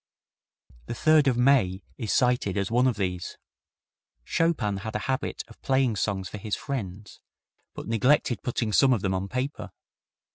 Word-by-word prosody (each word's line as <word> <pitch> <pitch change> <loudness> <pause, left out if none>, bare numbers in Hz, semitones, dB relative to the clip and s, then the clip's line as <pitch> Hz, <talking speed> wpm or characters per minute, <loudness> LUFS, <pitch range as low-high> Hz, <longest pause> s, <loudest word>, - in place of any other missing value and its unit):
The - - -4
Third 155 +2 +4
of 125 -3 +2
May 120 -8 +3 0.2
is 110 -4 -2
cited 125 -6 +2
as 100 +1 -1
one 125 +2 +3
of 120 -4 0
these. 90 -3 -3 0.9
Chopin 155 -12 0
had 110 +2 -6
a 105 - -2
habit 135 +1 -2
of - - -17
playing 130 -4 +1
songs 95 -2 -1
for 105 - -8
his 105 +1 -2
friends, 105 -8 -6 0.6
but - - -7
neglected 120 +3 +2
putting 115 -3 -2
some 130 +3 +5
of 115 - -1
them 95 -1 0
on 95 +1 -2
paper. 130 +5 -3
115 Hz, 160 wpm, -26 LUFS, 100-130 Hz, 0.9 s, some